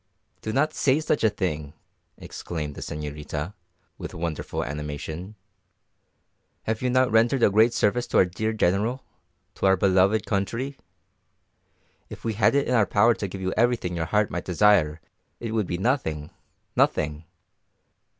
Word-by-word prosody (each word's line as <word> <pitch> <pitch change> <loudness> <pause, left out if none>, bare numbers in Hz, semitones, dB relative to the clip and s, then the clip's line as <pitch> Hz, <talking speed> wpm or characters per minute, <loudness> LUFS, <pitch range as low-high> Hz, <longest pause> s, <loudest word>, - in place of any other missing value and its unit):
"Do 110 - -3
not 150 +6 +1
say 135 +2 +2
such 155 -3 0
a 110 - +5
thing!" 75 -8 -3 0.4
exclaimed 75 -4 -6
the - - -9
señorita, 75 +3 -5 0.5
with - - -7
wonderful 80 -2 -3
animation. 75 +6 -6 1.3
"Have 110 0 -2
you 125 - +1
not 130 -1 +3
rendered 115 +3 +3
a - - +5
great 110 +4 +5
service 120 +3 +1
to - - 0
our - - +6
dear 110 +5 -2
General 110 +5 0 0.5
to - - 0
our 95 0 +5
beloved 95 +3 +3
country! 115 +7 -2 1.3
If - - -10
we 115 - 0
had 110 +6 +3
it 140 - +2
in - - 0
our 110 -5 +4
power 115 +3 +4
to 100 - -4
give 95 +1 -7
you 95 0 -1
everything 115 -6 +1
your 80 -1 -1
heart 105 +3 +1
might 85 +2 -4
desire 90 -5 +3 0.4
it 115 -2 -4
would 110 -4 0
be 90 - -2
nothing, 90 - -1 0.4
nothing. 75 +1 +1
100 Hz, 155 wpm, -25 LUFS, 85-115 Hz, 1.3 s, our